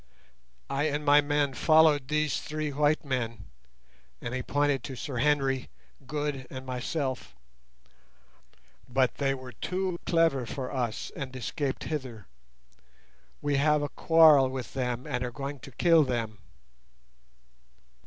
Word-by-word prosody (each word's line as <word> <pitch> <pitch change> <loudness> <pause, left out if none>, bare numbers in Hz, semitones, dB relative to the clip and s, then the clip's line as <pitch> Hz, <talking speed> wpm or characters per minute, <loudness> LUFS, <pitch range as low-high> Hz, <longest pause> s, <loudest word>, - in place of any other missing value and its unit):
I 140 +2 0
and 150 0 -1
my 145 +1 +6
men 145 -1 0
followed 155 -1 +4
these 150 0 0
three 155 -1 -3
white 150 +2 +1
men," 115 -6 -3 0.7
and 120 - -5
he 130 - -2
pointed 145 -1 0
to 135 - -6
Sir 130 0 -5
Henry, 135 -1 +1 0.4
Good, 145 -3 -3
and 130 -1 -8
myself, 130 - -3 1.5
"but 130 0 +1
they 135 -1 +1
were 130 -1 -9
too 180 +8 -3
clever 165 -7 +2
for 130 0 -5
us, 120 -5 -3
and 130 -2 -6
escaped 135 +2 -3
hither. 130 -9 -5 1.2
We 145 -1 +1
have 150 +1 +3
a 145 - -2
quarrel 155 -5 +6
with 130 -2 -6
them, 125 -1 -2
and 125 0 -2
are 125 - -2
going 140 +2 -6
to 135 - -11
kill 165 +3 +4
them." 115 -5 -3
135 Hz, 135 wpm, -28 LUFS, 130-150 Hz, 1.5 s, my